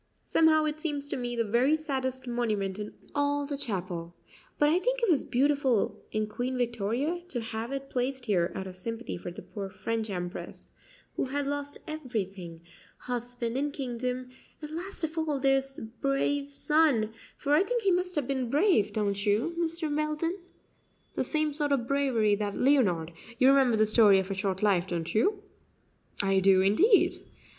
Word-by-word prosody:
Somehow 315 -1 +4
it 305 0 -2
seems 290 -3 -2
to - - -1
me 245 -2 -3
the 230 - +1
very 245 +8 +3
saddest 260 -4 -3
monument 215 -5 -1
in 210 0 -5 0.2
all 285 0 +1
the 285 0 -3
chapel; 180 -8 -4 0.4
but 295 - +4
I 325 +4 +3
think - - 0
it 465 -6 +2
was 300 - +2
beautiful 270 -3 +1
in 215 0 0
Queen 245 +4 -3
Victoria 240 - -1
to 250 - -2
have 225 +1 -4
it 275 0 -5
placed 255 0 -2
here 180 -6 +1
out 190 - -4
of 185 -1 -8
sympathy 230 +6 -5
for 175 - -6
the 175 - -9
poor 195 +2 -6
French 225 +2 -3
Empress, 180 -2 -6 0.4
who - - 0
had 280 +2 -2
lost 285 0 -3
everything 195 - -5 0.4
husband 245 -1 -4
and 285 +2 0
kingdom, 255 -1 -3 0.3
and, 300 -1 -8
last 350 +3 -5
of 320 +1 -2
all, 305 -3 -1
this 270 0 +1 0.2
brave 280 +1 0
son; 285 -6 +2 0.3
for 290 0 0
I 300 - +6
think 475 +2 -1
he 390 - +3
must 360 0 0
have 295 -4 0
been 260 -3 -1
brave, 285 - +3
don't 200 -2 -1
you, 220 +11 +1
Mr. 325 -2 -1
Belden? 305 +3 -1 0.8
The - - 0
same 310 -1 0
sort 290 -1 0
of 250 -4 +1
bravery 260 -7 +2
that 205 -1 -2
Leonard 190 - +2 0.2
you 255 - +5
remember 265 -4 +4
the 215 - +4
'Story 215 -2 +7
of 190 +1 -1
a - - +1
Short 195 0 -2
Life,' 190 -3 +3
don't 170 -3 -3
you?" 400 - +1 0.8
"I 195 -1 +3
do, 190 0 +5
indeed." 355 - +4
255 Hz, 175 wpm, -29 LUFS, 210-295 Hz, 0.8 s, Story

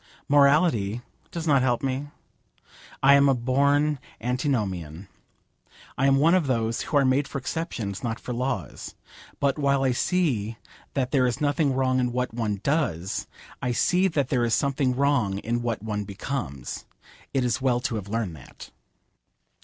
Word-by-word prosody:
Morality 140 - +3 0.3
does 170 -1 -5
not 140 -4 +4
help 125 -1 +1
me. 135 +2 -2 1.0
I 140 +1 +8
am 140 0 +6
a 135 - +4
born 140 +4 +2 0.2
antinomian. 105 - -2 0.9
I 135 - +2
am 135 - +5
one 155 +5 +4
of 180 -6 +2
those 115 -3 0
who 150 - 0
are 140 - +4
made 130 +2 +2
for - - -5
exceptions, 130 - -4
not 115 -1 -2
for 125 - -5
laws. 125 +3 -4 0.4
But 140 +1 +1
while 140 -1 +2
I 130 - +3
see 120 - 0 0.4
that 130 -2 0
there 130 -3 +3
is 120 - -2
nothing 145 -1 +1
wrong 130 -1 +2
in 125 -1 0
what 125 -1 -2
one 105 -4 -2
does, 125 - -1 0.3
I 125 - 0
see 180 +9 +3
that 145 -7 -1
there 125 -3 +1
is 115 -1 +2
something 135 -2 0
wrong 130 -8 +1
in 120 +4 -2
what 115 -3 -3
one 105 -2 -2
becomes. 100 - -5 0.5
It 130 -2 +1
is 120 +1 0
well 125 -2 +2
to 125 - -2
have 100 -2 -6
learned 110 -6 -2
that. 65 - -13
130 Hz, 165 wpm, -25 LUFS, 115-140 Hz, 1.0 s, I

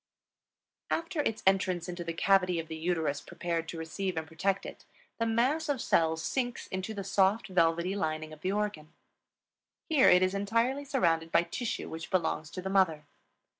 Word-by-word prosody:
After 330 -1 -1
its 225 -6 -2
entrance 190 -2 +2
into 175 -1 -5
the 170 - -3
cavity 185 +1 +3
of 165 -1 -3
the 160 - -4
uterus 160 -3 -1
prepared 165 -1 -3
to 170 - -6
receive 170 +3 -3
and 160 - -2
protect 190 +5 -1
it, - - -9 0.4
the 230 - +1
mass 260 +8 +1
of 280 -3 0
cells 160 -9 +2
sinks 245 -3 -2
into 190 +4 -4
the 200 - -4
soft, 195 +3 +2
velvety 170 +1 +2
lining 155 -3 -2
of 155 - -13
the 185 - 0
organ. 205 -7 -2 1.0
Here 300 -5 +6
it 180 +1 +6
is 185 +1 +1
entirely 230 +8 0
surrounded 165 - +1
by 170 - +4
tissue 215 +7 -4
which 165 0 -7
belongs 160 -4 0
to 185 - -7
the - - -3
mother. 165 -6 +2
185 Hz, 175 wpm, -30 LUFS, 165-210 Hz, 1.0 s, Here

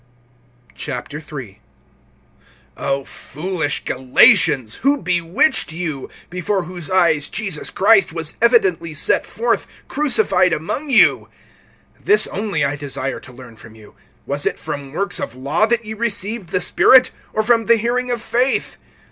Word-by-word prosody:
III. 115 -9 -9 1.1
O 135 0 -2
FOOLISH 160 -1 -4
Galatians, 130 - +3
who 280 +2 +1
bewitched 175 - +1
you, 160 -5 -5 0.2
before 180 +2 -2
whose 175 -1 -7
eyes 170 -6 +2
Jesus 195 0 -3
Christ 200 -1 +3
was 160 -2 -4
evidently 190 -9 +2
set 155 - +2
forth[3:1], 475 - -2 0.2
crucified 195 - +2
among 220 - -3
you? 260 - +4 0.7
(2)This 420 - +3
only 195 -7 -1
I 140 +1 -2
desire 135 -2 -4
to - - -14
learn 125 -2 -14
from 110 0 -14
you: 110 -2 -17 0.3
Was 140 +3 -2
it - - -2
from 145 -3 -6
works 195 +2 -1
of 115 - -5
law 145 +11 0
that 235 0 0
ye 215 - -6
received 215 -3 -3
the 185 -1 -1
Spirit, 260 +7 +5 0.2
or 220 - -1
from 230 0 +2
the 235 0 +5
hearing 245 +3 -1
of 240 -2 -1
faith? 250 +3 0
180 Hz, 140 wpm, -19 LUFS, 145-220 Hz, 1.1 s, Spirit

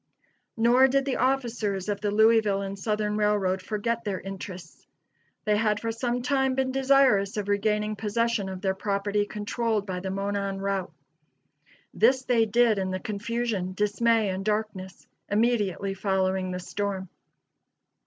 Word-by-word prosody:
Nor 240 +3 +5
did 275 +1 +1
the 275 - -1
officers 235 -7 0
of 205 -1 -2
the 210 - 0
Louisville 215 -1 +3
and 195 0 -6
Southern 210 0 -1
Railroad 205 -3 +1
forget 230 +4 -2
their 200 -4 -2
interests. 185 -3 -9 0.6
They 210 -1 +3
had 210 0 +1
for 230 - -2
some 240 +1 -2
time 265 0 +1
been 265 0 0
desirous 260 -7 +3
of 205 -1 -2
regaining 210 +1 0
possession 220 -1 -1
of 190 -1 -6
their 190 -1 +1
property 205 +1 -1
controlled 215 0 -2
by 185 -2 -4
the 190 +1 -5
Monon 195 0 -2
Route. 195 -2 -2 1.0
This 260 0 +3
they 235 -3 +2
did 225 -1 +3
in 190 -1 -1
the 185 0 -2
confusion, 210 -2 -3
dismay 210 +2 +2
and 190 +1 -3
darkness, 210 -3 -3 0.2
immediately 205 -3 +1
following 190 -1 0
the 180 0 -4
storm. 190 +1 -3
210 Hz, 145 wpm, -26 LUFS, 195-230 Hz, 1.0 s, Nor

